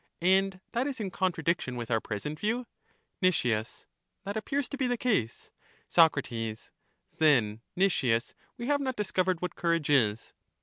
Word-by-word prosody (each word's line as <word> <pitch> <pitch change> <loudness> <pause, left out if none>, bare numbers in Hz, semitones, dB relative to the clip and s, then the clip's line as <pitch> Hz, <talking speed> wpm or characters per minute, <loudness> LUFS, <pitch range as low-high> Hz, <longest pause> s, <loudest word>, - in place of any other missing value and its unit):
And 190 +1 +3
that 245 +4 0
is 270 -3 -4
in 200 -4 -3
contradiction 170 -7 -1
with 120 -1 -5
our 115 -1 +2
present 150 +9 -5
view? 230 +4 -1 0.6
Nic. 185 -2 +4
That 120 - -5
appears 275 +5 -1
to - - -4
be 265 -2 +1
the 245 0 0
case. 205 - -1 0.4
Soc. 165 -3 +5 1.0
Then, 115 -9 +3 0.2
Nicias, 130 -12 +2 0.2
we 240 - -5
have 285 +2 +1
not 260 -2 -2
discovered 185 -3 0
what 180 - -2
courage 170 -3 0
is. 115 -6 +2
180 Hz, 145 wpm, -29 LUFS, -, 1.0 s, Soc